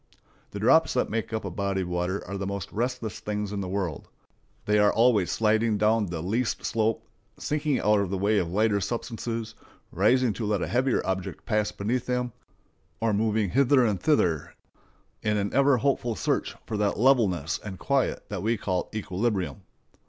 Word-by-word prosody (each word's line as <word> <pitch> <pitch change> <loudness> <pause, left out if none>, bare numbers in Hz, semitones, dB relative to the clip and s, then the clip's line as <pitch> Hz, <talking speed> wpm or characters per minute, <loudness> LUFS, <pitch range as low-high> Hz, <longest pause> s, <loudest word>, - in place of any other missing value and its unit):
The - - -7
drops - - +4
that - - 0
make 110 0 -2
up 110 -2 -3
a 95 - -4
body 100 +1 -1
of 90 - -3
water 90 +2 -2
are 100 - -5
the 100 0 -3
most 100 -1 -4
restless 120 -1 -3
things 105 -1 -3
in 100 - -2
the 95 - -4
world; 95 -6 -3 0.6
they 105 0 +3
are 105 0 +5
always 115 -5 +3
sliding 110 0 +2
down 105 0 +2
the 85 -2 -4
least 115 +6 -1
slope, 110 0 0 0.3
sinking 150 -2 0
out 105 0 +3
of 100 -2 -1
the 95 - -2
way 100 +2 +2
of 85 - -2
lighter 105 +1 +2
substances, 115 0 -4 0.4
rising 120 +5 +3
to 110 - -4
let 105 -3 0
a - - -2
heavier 125 +1 +1
object 95 +1 -3
pass 105 -3 0
beneath 115 +5 -2
them, 125 -1 -1 0.7
or 115 -1 +1
moving 105 -2 +1
hither 135 0 +4
and 105 -5 0
thither 85 - +1 0.7
in 105 -1 0
an 100 0 -2
ever 140 -1 +4
hopeful 120 -2 0
search - - -1
of 105 - -3
that 105 -1 +1
levelness 105 - +2
and 95 -3 -6
quiet 140 +4 0
that - - -4
we 115 +2 +1
call 95 -3 -2
equilibrium. 95 - -2
105 Hz, 180 wpm, -26 LUFS, 100-115 Hz, 0.7 s, are